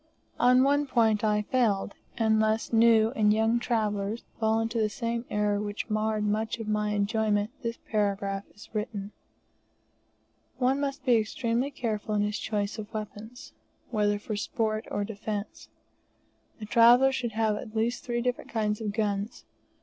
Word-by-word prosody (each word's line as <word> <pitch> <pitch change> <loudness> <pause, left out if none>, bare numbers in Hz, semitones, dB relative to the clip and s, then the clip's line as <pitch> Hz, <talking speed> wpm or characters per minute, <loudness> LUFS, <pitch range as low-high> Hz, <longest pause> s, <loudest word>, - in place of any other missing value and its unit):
On 250 +1 +5
one 285 +1 +2
point 220 -4 +2
I 210 -1 +2
failed, 210 -5 +1 0.2
and 220 -1 +3
lest 220 +2 0
new 225 -1 +5
and 215 -4 +3
young 225 +2 +2
travellers 215 -2 -1 0.2
fall 220 0 +2
into 225 +1 -1
the 215 -1 +2
same 230 +2 -3
error 210 -1 0
which 210 +1 -4
marred 215 0 0
much 215 +2 -1
of 225 -2 -6
my 210 0 0
enjoyment, 210 0 +1
this 230 -1 -3
paragraph 200 -2 -1
is 205 - -13
written. 210 -1 -4 1.5
One 260 +2 +2
must 280 -1 -3
be 245 -3 +5
extremely 230 +4 -1
careful 215 -5 -3
in 205 - +2
his 210 0 -2
choice 210 0 -2
of 215 0 -7
weapons, 220 +4 -8 0.4
whether 205 -2 +1
for 215 +1 -5
sport 215 0 -2
or 205 - -1
defence. 205 0 -5 0.9
A 215 - -6
traveller 240 +4 +6
should 240 -4 -3
have 220 -1 +1
at 215 +1 -8
least 230 +2 0
three 240 -1 -2
different 250 0 -2
kinds 215 -1 -1
of 210 -2 -2
guns. 205 -1 -2
220 Hz, 155 wpm, -28 LUFS, 210-235 Hz, 1.5 s, traveller